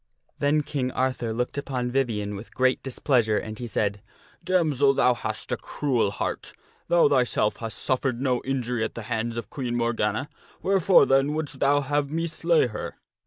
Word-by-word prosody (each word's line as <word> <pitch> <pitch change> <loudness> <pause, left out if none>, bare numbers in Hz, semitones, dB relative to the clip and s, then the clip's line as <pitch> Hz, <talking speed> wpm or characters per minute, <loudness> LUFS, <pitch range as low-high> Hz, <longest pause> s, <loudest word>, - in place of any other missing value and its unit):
Then 150 +1 +2
King 135 -3 -2
Arthur 130 -3 -1
looked 125 +5 -2
upon 125 -3 -3
Vivien 115 -6 -1
with 100 +3 -10
great 130 0 +2
displeasure, 120 -4 +1
and 110 -1 -5
he 120 - -4
said, 105 -2 -1 0.2
" - - -30
Damsel, 155 -7 +2
thou 125 - +4
hast 120 - -5
a - - 0
cruel 130 -8 0
heart! - - -4 0.3
Thou 175 -3 +5
thyself 125 -6 +2
hast 115 -1 -4
suffered 130 -2 0
no 130 -2 0
injury 125 -3 -1
at 110 - -4
the 115 - -6
hands 115 +1 -2
of 115 - -6
Queen 125 -4 -3
Morgana; 115 +2 0 0.4
wherefore, 195 -1 +5
then, 135 +2 +3
wouldst 155 -1 -3
thou 145 +1 +3
have 145 0 -1
me 165 +3 -1
slay 165 -1 +2
her? 115 -4 -5
130 Hz, 175 wpm, -25 LUFS, 115-145 Hz, 0.4 s, Thou